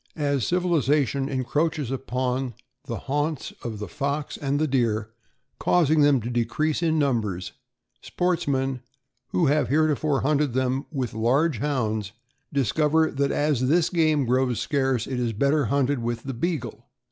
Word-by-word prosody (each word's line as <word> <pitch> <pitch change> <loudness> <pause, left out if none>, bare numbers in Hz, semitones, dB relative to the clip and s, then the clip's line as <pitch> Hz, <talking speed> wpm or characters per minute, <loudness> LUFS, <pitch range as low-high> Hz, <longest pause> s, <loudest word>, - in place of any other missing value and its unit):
As 140 -5 0
civilization 145 -6 +1
encroaches 145 +1 -1
upon 130 -1 -2 0.3
the - - -4
haunts 145 +1 -2
of 115 -3 -4
the 105 - -5
fox 140 0 -3
and 140 0 -1
the 155 - +2
deer, 110 -5 0 0.5
causing 160 -3 +3
them 145 -2 +5
to 115 - -4
decrease 120 +7 0
in 160 -2 +2
numbers, 110 - 0 0.5
sports 180 -2 -1
men 135 -2 0 0.5
who 175 - +1
have 145 -2 +2
heretofore 150 -1 +2
hunted 145 -2 +1
them 130 +1 0
with 130 -6 -3
large 125 +5 +1
Hounds, 110 -7 -1 0.4
discover 150 +5 +2
that 140 0 0
as 145 -4 +1
this 165 +1 +3
game 155 -5 +2
grows 125 0 +1
scarce 135 -5 0
it 130 -2 -3
is 120 -2 -1
better 140 +6 +2
hunted 140 +2 +1
with 120 0 -3
the 135 - -4
Beagle. 145 0 -3
140 Hz, 145 wpm, -25 LUFS, 125-150 Hz, 0.5 s, them